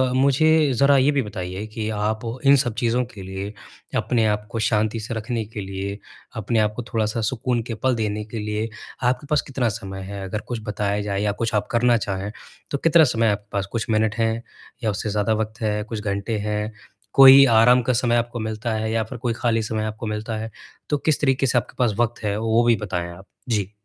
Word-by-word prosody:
मुझे 145 +3 +4
ज़रा 140 +2 +4
ये 135 +3 +4
भी 140 -2 +1
बताइए 95 -2 -5
कि 110 -1 -3
आप 105 +1 -1 0.3
इन 140 +1 +8
सब 120 -4 +1
चीज़ों 120 +2 +1
के 100 - -9
लिए 95 +2 -6 0.4
अपने 115 -3 +1
आप 105 0 -1
को 115 - -3
शांति 110 +1 +1
से 110 +2 -5
रखने 115 0 -3
के 105 0 -7
लिए 95 +1 -5 0.4
अपने 110 +1 0
आप 105 -1 +2
को 120 - -4
थोड़ा-सा 110 0 0
सुकून 120 +1 -1
के 115 - -3
पल 130 +2 +1
देने 105 -2 -2
के 110 +1 -6
लिए, 105 +1 -2 0.3
आपके 125 +3 0
पास 150 - +3
कितना 125 -4 0
समय 95 -3 -6
है? 100 +1 -6
अगर 105 +3 -4
कुछ 120 -2 -3
बताया 105 -1 -1
जाए 100 -1 -2
या 105 0 +1
कुछ 115 +2 -3
आप 105 - 0
करना 120 0 +4
चाहें 100 -1 -3 0.4
तो 140 - 0
कितना 165 +3 +5
समय 115 -5 +2
आपके 105 0 -4
पास 100 -1 -1
कुछ 115 -1 -3
मिनट 110 0 +2
हैं 115 0 +1 0.4
या 110 - +2
उससे 105 +2 -3
ज़्यादा 105 +1 +1
वक़्त 110 +1 -3
है, 105 -1 0
कुछ 110 0 -5
घंटे 100 +2 -2
हैं? 105 +1 -2 0.4
कोई 135 0 +10
आराम 120 +2 +6
का 125 +1 0
समय 120 0 +2
आपको 120 0 -1
मिलता 110 +1 -3
है 110 0 -1
या 115 0 +1
फ़िर 110 +3 -8
कोई 120 -1 -1
खाली 115 -1 0
समय 110 0 -2
आपको 110 +2 -5
मिलता 105 +1 -3
है? 110 +1 -5 0.4
तो 145 - +2
किस 155 +1 0
तरीक़े 135 -1 +2
से 125 - +2
आपके 120 - -2
पास 120 -4 +2
वक़्त 120 -1 0
है 105 -1 0
वो 115 +1 +2
भी 120 -1 +4
बताएँ 90 -4 -3
आप? 95 +3 -12 0.2
जी। 100 -4 0
110 Hz, 220 wpm, -23 LUFS, 105-120 Hz, 0.4 s, कोई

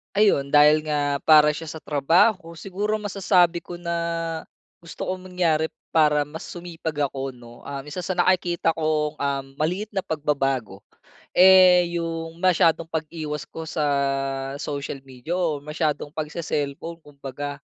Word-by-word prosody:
Ayun, 170 -10 +3
dahil 150 +1 +6
nga 145 -2 -1
para 150 -1 +6
siya 160 0 -6
sa 160 - -8
trabaho, 165 +6 +2
siguro 200 +5 -3
masasabi 185 -4 +2
ko 175 0 -8
na, 170 -1 -3 0.9
gusto 170 - -7
kong 185 0 -4
mangyari 165 -4 0 0.2
para 150 -2 +3
mas 160 +2 -8
sumipag 160 -4 -3
ako 135 0 -5
'no. 120 -1 -15
Ah, 140 -1 -5
isa 180 +4 -5
sa 190 - -2
nakikita 175 -2 +2
kong, 155 -1 0
um, 140 -2 -2
maliit 180 +8 -1
na 190 - +1
pagbabago 135 -9 -2 0.5
eh, 180 -2 +7
yung 165 0 -5
masyadong 165 -3 +3
pag-iwas 155 -2 -4
ko 160 0 -7
sa 155 - -2 0.7
social 140 -1 -5
media 135 +6 -6
o 165 -5 0
masyadong 150 0 -2
pagse-cellphone 155 +1 -4
kumbaga. 140 0 -7
155 Hz, 135 wpm, -24 LUFS, 145-175 Hz, 0.9 s, eh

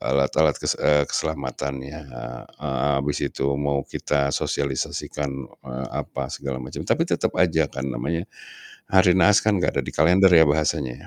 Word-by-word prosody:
alat-alat 70 +2 +2
kes - - -1
eee, 75 -1 +4
keselamatannya. 70 -1 -3
Eee - - -8 0.2
heeh, 70 0 0
abis 75 0 -1
itu 70 - -3
mau 70 -1 0
kita 70 -1 -1
sosialisasikan, 70 +1 -2 0.4
eee, 65 +1 -4
apa - - -4
segala 70 -2 -4
macam. 65 - -7
Tapi - - +2
tetep - - -1
aja 80 -4 +2
kan 65 0 -5
namanya, 80 +6 -2 0.6
hari 95 -1 +4
naas 105 +2 +5
kan 105 -2 +2
gak 90 - 0
ada - - -8
di - - -4
kalender 90 +5 +5
ya 80 -2 +7
bahasanya 75 -3 0
70 Hz, 155 wpm, -23 LUFS, 70-80 Hz, 0.6 s, ya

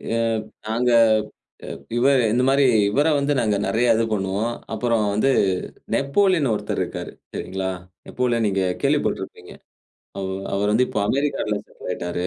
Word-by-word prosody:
அ - - +1 0.5
நாங்க 120 +3 +1 0.7
அ - - -9 0.3
இவரு 130 0 +4
இந்த 125 +2 +2
மாரி 140 +1 +4 0.3
இவரை 145 +8 +2
வந்து 140 +1 +1
நாங்க 105 -3 +1
நிறைய 115 +1 +3
இது 115 - +1
பண்ணுவோம். 100 +4 -1 0.2
அப்புறம் 115 -1 +1
இது 135 - +3 0.7
நேப்போலியன் 150 - +2
ஒருத்தரு - - -3
இருக்காரு. - - -7 0.2
சரிங்களா, 95 0 -3 0.4
நேப்போலியன் 120 -3 0
நீங்க 95 -1 0 0.2
கேள்விப்பட்டிருப்பீங்க. - - -1 0.6
அவரு 95 0 -3 0.2
அவர் 105 +1 +1
வந்து 125 +4 +3
இப்போஅமெரிக்கால 105 0 0
செட்டில் - - -11
ஆயிட்டாரு. 90 +1 -3
115 Hz, 130 wpm, -22 LUFS, 105-135 Hz, 0.7 s, இவரு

